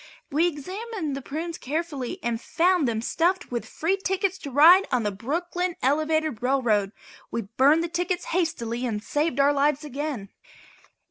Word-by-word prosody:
We 315 +5 +3
examined 365 +1 -4
the 275 - -5
prunes 325 +5 -5
carefully 290 -3 -3
and 235 -1 -1
found 350 -3 +2
them 225 -1 -1
stuffed 350 +6 0
with 240 -1 -3
free 360 +5 -1
tickets 385 0 -1
to 285 - -7
ride 330 +8 +7
on 250 -2 +1
the 210 - 0
Brooklyn 345 - -2
Elevated 310 -2 +1
Railroad. 240 -6 +1 0.4
We 230 - -3
burned 270 +10 +3
the - - -1
tickets 350 +1 -2
hastily 255 -10 -1
and 210 -2 -3
saved 295 0 -1
our 280 +1 +5
lives 290 +1 +1
again. 280 -7 -4
295 Hz, 155 wpm, -25 LUFS, 250-345 Hz, 0.4 s, ride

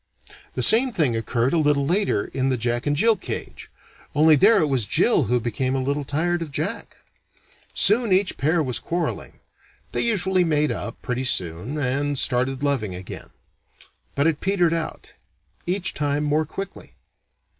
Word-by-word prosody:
The - - 0
same 250 +4 +6
thing 155 - +1
occurred 115 +3 -1
a 170 - +2
little 145 -2 +2
later 175 - 0
in 130 0 -2
the 130 - 0
Jack 120 +3 -2
and 145 - +1
Jill 225 +8 +4
cage, - - -7 0.5
only 155 +1 +6
there 205 +9 +5
it 160 - +2
was 130 -7 0
Jill 165 - +3
who 120 +3 +1
became 130 +3 -2
a - - 0
little 140 +2 -1
tired 170 +5 -1
of 165 - -5
Jack. - - -5 0.8
Soon 220 +2 +3
each 190 +1 +2
pair 160 +3 +1
was 125 -3 -1
quarreling. 170 0 -4 0.5
They - - -2
usually 190 -5 +1
made 150 -3 +1
up, - - -6
pretty 125 +1 -3
soon, 90 - 0
and 145 +1 -1
started 130 +2 0
loving 120 -10 -1
again. 90 +1 -9 0.9
But 140 - +1
it 160 -2 0
petered 180 -4 +1
out; 165 -1 -5 0.5
each 185 +1 -1
time 145 0 -1
more 150 +1 0
quickly. 195 +4 -8
145 Hz, 165 wpm, -23 LUFS, 130-175 Hz, 0.9 s, same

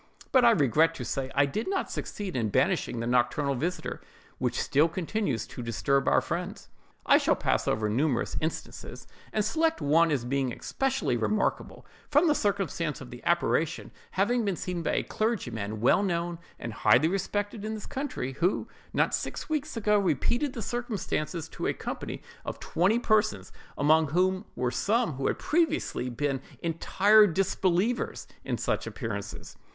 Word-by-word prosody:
But 260 -2 +5
I 240 - +8
regret 160 - +3
to - - -5
say 135 -1 -2
I 140 +1 +5
did 140 +11 -3
not 385 0 -1
succeed 200 -3 -5
in 115 -4 0
banishing 115 - +1
the 115 - -2
nocturnal 125 +4 +1
visiter, 165 +8 -3 0.4
which - - -1
still 150 +4 +3
continues 170 - -2
to - - -8
disturb 135 +4 0
our - - +4
friends. - - -5 0.4
"I - - +6
shall - - +2
pass - - 0
over 110 0 +1
numerous 125 +4 0
instances, 160 +1 -5 0.3
and 215 -1 0
select 325 +5 +1
one 165 +4 +4
as 135 -6 0
being 135 0 0
especially 270 - -1
remarkable, 210 - -1 0.2
from 295 +3 +4
the 305 - +5
circumstance 195 - -1
of 130 -2 -10
the 120 - -10
apparition 165 -2 +1 0.2
having 230 +5 +2
been 200 -3 0
seen 180 0 -3
by - - -1
a - - +1
clergyman 115 - -2
well 125 - +4
known 170 -3 -1 0.2
and 115 - -6
highly 130 +7 +4
respected 205 +3 -2
in 220 +1 -3
this 215 - -7
county, 260 - -4
who, 170 +8 0 0.3
not - - +2
six - - -3
weeks 305 -3 -2
ago, 210 -1 +3
repeated 235 - 0
the 230 - -5
circumstances 195 -8 -3
to - - -4
a - - +1
company - - -5 0.2
of - - -5
twenty 190 +7 +2
persons, 215 -2 +1 0.3
among 155 +2 +4
whom 185 +6 +1
were 125 -1 0
some 225 - +1
who 135 +1 -2
had - - 0
previously 320 - 0
been 135 +1 -1 0.2
entire 200 +6 +5
disbelievers 195 +4 0 0.2
in - - -2
such - - -1
appearances. - - -6
170 Hz, 165 wpm, -28 LUFS, 140-215 Hz, 0.4 s, I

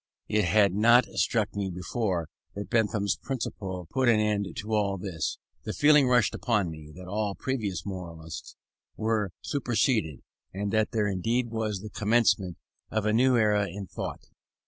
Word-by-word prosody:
It 105 -2 +2
had 100 +1 +4
not 120 +4 +6
struck 110 -3 0
me 100 -1 -1
before, 90 -1 -2 0.3
that 100 -2 -6
Bentham's 105 -3 +1
principle 95 -8 -4
put 130 -2 +2
an 110 -2 +5
end 105 -2 +1
to 110 +1 -4
all 100 -2 +1
this. 90 -4 -3 0.3
The - - -4
feeling 145 -2 +5
rushed 125 -2 +3
upon 105 -8 0
me, 75 -1 -10
that 90 0 -10
all 100 +1 -2
previous 105 -10 -3
moralists 85 -4 -7 0.4
were 110 -3 0
superseded, 115 - 0 0.3
and 100 +1 -2
that 110 -1 +3
here 110 -3 +1
indeed 115 +5 0
was 110 -4 -2
the 105 0 -8
commencement 105 -4 +2 0.3
of 110 -1 -1
a 105 - +2
new 125 +2 +4
era 105 -2 +3
in 100 +3 -6
thought. - - -6
105 Hz, 160 wpm, -28 LUFS, 95-115 Hz, 0.4 s, not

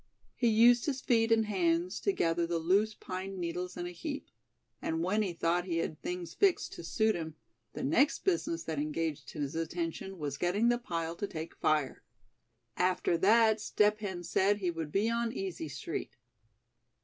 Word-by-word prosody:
He 240 - +1
used 235 +3 +5
his 270 -3 0
feet 230 -3 +2
and 225 -1 +4
hands 180 -2 0
to 400 - +1
gather 170 - +1
the 170 0 0
loose 200 +6 +2
pine 190 0 -6
needles 180 +1 -4
in 175 - -3
a 175 - -5
heap; 285 - -6 0.5
and 160 +1 -1
when 205 +5 +1
he 200 -4 0
thought 170 +1 0
he 170 -3 -1
had 155 -2 -3
things 180 -1 -4
fixed 395 -3 +2
to - - -8
suit 220 +6 +2
him, 160 -4 -5 0.4
the - - -5
next 265 - +2
business 335 -3 0
that 160 -3 -3
engaged 150 -2 -2
his 145 -1 -3
attention 165 +3 -3
was 145 -4 -4
getting 200 +7 +2
the 240 0 +2
pile 165 -7 -3
to 205 - -2
take 160 -2 -6
fire. 150 -4 0 0.7
After 180 -1 +1
that 220 +2 +5
Step 210 0 +2
Hen 190 -4 -4
said 200 +4 +2
he 185 -4 -1
would 165 -3 -5
be 200 +5 +2
"on 235 0 0
Easy 185 -8 -4
Street." 135 -3 -5
180 Hz, 180 wpm, -31 LUFS, 165-220 Hz, 0.7 s, used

